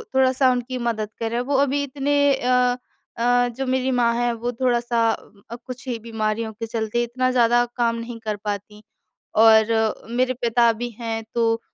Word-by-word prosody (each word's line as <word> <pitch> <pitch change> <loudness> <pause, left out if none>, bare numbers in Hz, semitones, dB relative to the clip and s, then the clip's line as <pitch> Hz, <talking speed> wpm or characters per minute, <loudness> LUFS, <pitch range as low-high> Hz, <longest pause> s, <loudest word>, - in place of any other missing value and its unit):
थोड़ा-सा 260 0 +4
उनकी 250 +1 -3
मदद 225 -3 -2
करें। 230 +1 -1
वो 270 +3 -1
अभी 285 +1 -1
इतने 285 +1 -1 0.2
अ 250 -1 +2 0.4
अ, 245 +1 +3
जो 255 +3 -4
मेरी 260 0 0
माँ 235 -1 +3
है 240 0 +1
वो 235 +1 -3
थोड़ा-सा 240 -1 0
अ, 220 +1 -9
कुछ 255 +1 -9
ही 240 - -2
बीमारियों 220 0 -2
के 225 +2 -6
चलते 225 +1 -1
इतना 255 +2 -1
ज़्यादा 240 -1 +4
काम 235 -1 +1
नहीं 230 0 -7
कर 215 -1 -1
पाती। 210 +1 -5 0.5
और 220 0 +4
मेरे 255 +2 +1
पिता 235 0 +4
भी 240 +2 -4
हैं 225 -1 -3
तो 230 -1 +1
235 Hz, 170 wpm, -22 LUFS, 225-250 Hz, 0.5 s, थोड़ा-सा